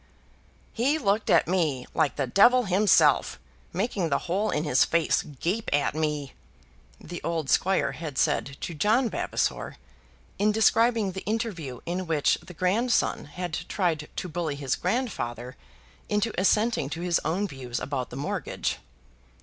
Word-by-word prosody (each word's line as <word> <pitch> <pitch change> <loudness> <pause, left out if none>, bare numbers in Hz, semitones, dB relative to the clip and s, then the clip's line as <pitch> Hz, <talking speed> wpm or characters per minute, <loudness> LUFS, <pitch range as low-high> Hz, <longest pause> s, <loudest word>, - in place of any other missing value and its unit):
"He 270 +7 +1
looked 210 -6 0
at - - +4
me 160 -8 0
like 155 -4 +1
the 140 - 0
devil 240 - +5
himself 195 -1 +3 0.3
making 190 -2 -1
the 140 - +2
hole 195 +5 0
in 150 - 0
his 140 -4 +4
face 170 -1 +2
gape 170 - -3
at 145 0 +1
me," 150 -3 -2 0.7
the 175 +1 -8
old 165 -4 -2
squire 190 +1 +2
had 155 -5 -7
said 140 -2 0
to 175 - -4
John 220 - +2
Vavasor - - -2 0.6
in 210 +1 +3
describing 225 -1 +3
the 190 +1 -7
interview 200 - -3
in 180 +1 -3
which 155 -3 +2
the 180 - -12
grandson 215 +9 +1
had 175 +3 -6 0.2
tried 165 -6 -1
to - - -4
bully 165 -3 -3
his 140 -2 -1
grandfather 130 - -3 0.5
into 210 +2 0
assenting 210 - +2
to 165 +3 -5
his 175 -1 +1
own 180 +7 0
views 130 -7 -5
about 130 -3 -3
the - - -9
mortgage. 140 - -3
175 Hz, 150 wpm, -26 LUFS, 150-210 Hz, 0.7 s, devil